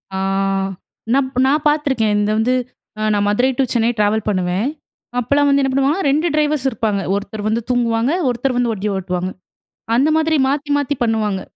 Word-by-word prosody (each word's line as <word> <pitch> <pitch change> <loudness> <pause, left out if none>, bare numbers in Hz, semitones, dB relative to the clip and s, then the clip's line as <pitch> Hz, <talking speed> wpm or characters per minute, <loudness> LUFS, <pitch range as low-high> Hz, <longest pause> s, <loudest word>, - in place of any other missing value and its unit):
ஆ. - - -2 0.9
நாப் 265 -1 0
நா 270 - +3 0.2
பார்த்துருக்கேன். 275 -8 +1
இந்த 210 0 +1
வந்து 235 +3 +2 0.5
அ - - -3
நா 205 - +1
மதுரை 245 +6 +2
டூ 270 - +3
சென்னை 230 -1 +2
ட்ராவல் 210 +1 +1
பண்ணுவேன் 185 +3 0 0.5
அப்பல்லாம் 285 +4 +2
வந்து 280 0 +3
என்ன 270 - +1
பண்ணுவாங்க, 275 +7 +1
2 305 +5 +2
டிரைவர்ஸ் 300 -2 +1
இருப்பாங்க. 215 -4 -1
ஒருத்தர் 205 +1 -5
வந்து 225 +2 0
தூங்குவாங்க, 240 +1 +1 0.2
ஒருத்தர் 245 +2 -1
வந்து 245 -2 +1
வண்டி 210 0 -2
ஓட்டுவாங்க. 180 -1 -2 0.7
அந்த 280 +5 +3
மாதிரி 320 0 +1
மாத்தி 290 +1 -1
மாத்தி 285 0 -1
பண்ணுவாங்க. 215 -4 0
240 Hz, 165 wpm, -18 LUFS, 210-275 Hz, 0.9 s, நா